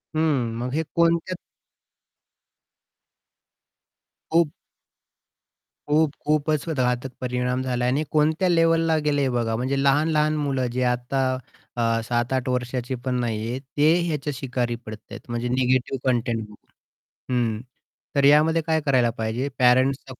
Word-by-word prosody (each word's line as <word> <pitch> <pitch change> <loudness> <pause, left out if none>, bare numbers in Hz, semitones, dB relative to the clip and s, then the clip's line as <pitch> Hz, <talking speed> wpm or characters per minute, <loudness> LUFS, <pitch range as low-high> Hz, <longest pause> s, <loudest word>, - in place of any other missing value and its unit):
हं. 145 -7 +1
मग 125 +2 -3
हे 160 +2 0
कोणत्या 170 +2 +2 3.0
खूप 165 -2 +3 1.4
खूप-खूपच 150 0 +1
घातक 125 -3 0
परिणाम 125 0 -1
झाला 125 -1 -2
आहे 125 - +2
आणि 145 +3 0
कोणत्या 155 +4 +2
लेव्हला 165 -1 +3
गेले 145 -1 +2
हे 135 - +1
बघा, 120 -2 -1
म्हणजे 130 +4 -1
लहान-लहान 150 +2 +2
मुलं 135 -4 -1
जे 130 +1 0
आता 125 +2 -1 0.5
अ, 115 -1 +1
7-8 120 +3 -1
वर्षाची 125 0 -2
पण 130 -1 0
नाही 115 -2 -2
आहेत, 130 +2 -4 0.2
ते 150 +2 +5
ह्याच्या 150 -3 -2
शिकारी 125 -2 -2
पडत 110 0 -7
आहेत, - - -7
म्हणजे 120 +1 -2
निगेटिव्ह 130 +1 +1
कंटेंट 120 -2 0
बघून. 105 0 -13 0.8
हं. 115 -3 0 0.5
तर 140 - +3
यामध्ये 155 +3 +5
काय 160 -1 +2
करायला 130 -4 +3
पाहिजे 115 +5 -2
पॅरेंट्सचा 130 +2 +3
130 Hz, 130 wpm, -24 LUFS, 125-150 Hz, 3.0 s, ते